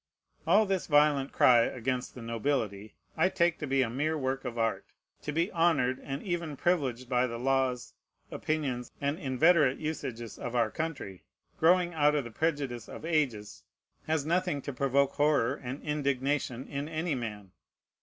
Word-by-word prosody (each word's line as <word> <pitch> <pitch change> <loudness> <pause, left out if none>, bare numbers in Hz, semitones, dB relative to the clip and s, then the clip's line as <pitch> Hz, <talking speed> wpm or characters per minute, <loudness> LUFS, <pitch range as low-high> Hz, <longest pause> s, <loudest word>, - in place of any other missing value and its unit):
All 215 - +5
this 190 -2 -1
violent 145 -2 +3
cry 120 -2 +6
against 125 +2 -1
the 125 - -8
nobility 115 -3 -2 0.2
I 185 - +3
take 170 -2 +1
to 150 - -4
be 135 0 +2
a 120 - -2
mere 155 +5 -1
work 135 -1 -2
of 120 -1 -4
art. 115 0 0 0.4
To 150 - -4
be 165 +6 0
honored 160 -7 +2
and 135 +1 -5
even 170 -6 -3
privileged 130 -9 0
by 125 0 +2
the 115 -1 -5
laws, 130 -2 0 0.4
opinions, 135 -6 -2
and 145 +4 -1
inveterate 145 0 +3
usages 120 -8 -5
of 120 0 -5
our 115 -2 +2
country, 145 - -5 0.4
growing 175 +1 +4
out 150 -1 +3
of 145 - +1
the 115 - -9
prejudice 140 -4 -2
of - - -8
ages, 135 -11 -1 0.4
has 155 -2 0
nothing 175 -2 0
to 140 - -5
provoke 140 +1 +2
horror 145 -4 +2
and 135 0 -6
indignation 140 -3 -1
in 140 +1 -4
any 160 0 -2
man. 105 -6 -5
140 Hz, 165 wpm, -30 LUFS, 125-155 Hz, 0.4 s, cry